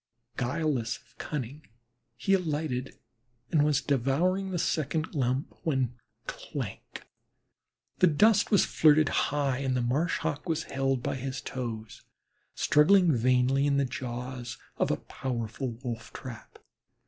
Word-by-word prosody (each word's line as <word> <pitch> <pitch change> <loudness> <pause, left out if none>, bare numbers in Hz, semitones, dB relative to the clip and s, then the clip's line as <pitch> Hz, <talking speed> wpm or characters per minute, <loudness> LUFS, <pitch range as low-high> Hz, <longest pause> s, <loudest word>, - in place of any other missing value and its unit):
Guileless 125 -3 -1
of - - -26
cunning, 145 +1 -5 0.5
he 160 +11 +1
alighted 150 -8 -1 0.5
and 150 -2 +4
was 150 -1 +2
devouring 165 +9 +1
a 180 - -1
second 155 -1 -1
lump 130 0 0
when 130 -6 0 0.3
clank - - -6 0.9
the 185 - +6
dust 205 +7 +4
was 205 - +5
flirted 155 -1 +5 0.2
high 140 -3 0
and 130 -2 0
the - - +1
Marsh 145 +8 +1
Hawk 155 +1 -3
was 160 0 0
held 135 -2 -1
by - - -1
his 130 0 -4
toes, 115 -4 -5 0.5
struggling 170 +3 +5
vainly 130 +3 +3
in 140 -1 +2
the 140 - +3
jaws 125 0 -5 0.2
of - - +1
a - - +1
powerful 120 0 -4
wolf 115 -3 -5
trap. 120 -4 -9
135 Hz, 130 wpm, -29 LUFS, 125-155 Hz, 0.9 s, the